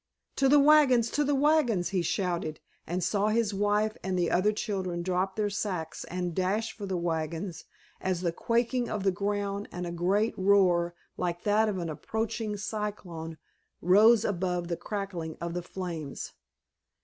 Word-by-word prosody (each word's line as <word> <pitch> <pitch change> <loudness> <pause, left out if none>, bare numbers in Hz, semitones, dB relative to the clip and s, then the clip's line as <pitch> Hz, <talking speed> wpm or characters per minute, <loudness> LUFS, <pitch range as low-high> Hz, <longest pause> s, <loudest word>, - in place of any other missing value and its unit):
"To 270 -1 +4
the 290 +1 +7
wagons, 280 -5 +5
to 295 - +1
the 290 0 +1
wagons!" 270 - +3
he 190 -3 0
shouted, 170 -3 -1 0.3
and 175 +2 -2
saw 205 0 +1
his 215 -1 +1
wife 205 +2 +1
and 190 -1 -1
the 175 -1 +1
other 195 +4 +3
children 190 -5 -3
drop 185 +1 -1
their 210 -1 0
sacks 180 -6 -3
and 180 0 -3
dash 195 +5 -1
for 205 -2 -6
the 190 -1 -1
wagons 165 +1 -3 0.4
as 185 -2 -1
the 175 -2 0
quaking 235 +5 0
of 210 -2 -2
the 195 - +3
ground 200 +1 -2
and 180 0 -4
a 170 - -4
great 190 +6 +1
roar 180 -3 +3 0.2
like 175 -1 -2
that 215 +1 +3
of 200 - -2
an 170 -2 -3
approaching 220 +6 -3
cyclone 200 -6 -5 0.4
rose 215 +5 +6
above 180 -2 -1
the 170 - 0
crackling 180 -4 -5
of 170 0 -4
the 175 - -2
flames. 170 -5 -6
195 Hz, 165 wpm, -29 LUFS, 175-215 Hz, 0.4 s, the